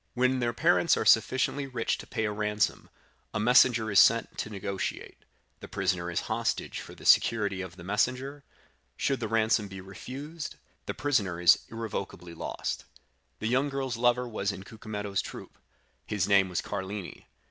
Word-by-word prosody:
When 130 +1 +2
their 120 -1 +1
parents 165 +6 +3
are - - -1
sufficiently 130 +6 +3
rich 125 -3 -1
to - - -9
pay 110 -3 -2
a 105 - -1
ransom, 105 0 -1 0.5
a - - +1
messenger 115 -1 +5
is 100 - +6
sent 115 0 +4
to - - -3
negotiate; 100 -2 -5 0.3
the - - -9
prisoner 85 -1 -1
is 85 - -1
hostage - - -2
for - - -10
the - - -13
security 100 -4 +4
of 95 -1 -7
the 90 - -11
messenger; 130 +8 -1 0.5
should 135 -1 0
the 115 - -2
ransom 110 -1 +2
be 95 -1 -9
refused, 135 - -7 0.3
the - - -3
prisoner 105 -12 0
is 85 -1 +6
irrevocably 100 -6 -5
lost. 85 - -4 0.5
The 110 - -3
young 130 +5 +2
girl's 135 -2 -2
lover 120 +1 +2
was 105 -3 -2
in 95 -1 -8
Cucumetto's 105 -2 -4
troop; - - -10 0.5
his 100 -3 0
name 100 -2 +4
was 90 - -1
Carlini. 100 -1 -6
110 Hz, 165 wpm, -29 LUFS, 100-125 Hz, 0.5 s, is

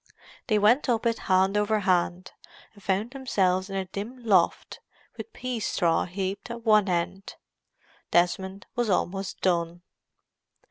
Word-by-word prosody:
They 215 -3 +2
went 235 +7 +3
up 235 -1 +1
it 230 -1 +1
hand 190 +1 +3
over 210 +1 +1
hand, 180 -1 0 0.4
and 205 - -18
found 195 +5 -1
themselves 195 -8 0
in 195 - -5
a 190 -1 -1
dim 220 +7 -7
loft, 190 -6 +2 0.4
with 455 - -8
pea 255 - -4
straw 170 -5 +1
heaped 190 +4 -4
at 235 0 -7
one 210 -3 +4
end. 180 +3 -2 0.7
Desmond 190 +3 0
was 240 -2 0
almost 195 +1 -1
done. 175 -1 0
195 Hz, 140 wpm, -26 LUFS, 185-220 Hz, 0.7 s, one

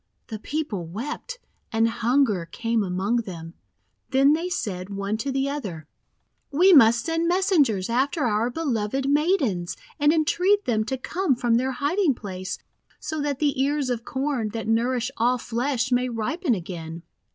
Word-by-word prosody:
The 220 -2 -5
people 225 - -3
wept, 290 - -6 0.3
and 225 0 +3
hunger 230 -5 +1
came 230 +5 -1
among 190 +5 0
them. 170 -7 -6 0.6
Then 275 +2 +4
said 190 - -3
they, 200 - -8
one 200 +2 -2
to 270 +5 -3
the 270 +1 0
other: 200 - -5 0.3
— - - -48 0.3
"We 360 +7 +5
must 235 -5 +6
send 330 0 0
messengers 335 - +2
after 270 +6 0
our 225 0 +1
beloved 265 -2 -1
Maidens, 280 - +1 0.2
and 295 +1 +5
entreat 360 +6 +2
them 220 -3 +1
to 265 +4 -2
come 335 +2 0
from 235 -1 +2
their 260 +2 0
hiding 295 +3 +1
place, 185 -4 -6 0.4
so 315 -1 -4
that 285 -2 -1
the 285 -2 +1
ears 280 -1 0
of 235 -1 -2
Corn, 265 -4 -2
that 225 -1 -4
nour 230 +3 +2
ish 245 +1 -2
all 245 +2 +2
flesh, 245 +2 -1
may 250 0 +2
ripen 245 - -1
again. 165 -2 -7
245 Hz, 165 wpm, -24 LUFS, 215-290 Hz, 0.6 s, must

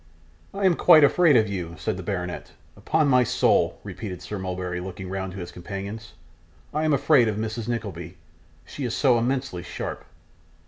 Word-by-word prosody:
'I 200 0 -1
am 180 -2 +5
quite 155 -1 +7
afraid 155 +1 +5
of 110 -1 +3
you,' 90 -4 -5
said 110 - -2
the 95 - -6
baronet. 90 -2 -5 0.2
'Upon 155 -1 +1
my 125 -2 +5
soul,' - - +2
repeated 95 -5 -7
Sir 105 - -5
Mulberry, 90 -1 -4
looking 95 0 -7
round 95 -1 -4
to - - -8
his 90 -2 -6
companions; 100 +4 -7 0.6
'I 155 +1 0
am 155 - +2
afraid 140 -3 +4
of 105 - -1
Mrs 110 +1 -4
Nickleby. 95 -7 -5 0.5
She 145 - -7
is 120 -2 -2
so 125 -4 +3
immensely 125 -6 -2
sharp. - - -6
110 Hz, 175 wpm, -25 LUFS, 95-130 Hz, 0.6 s, quite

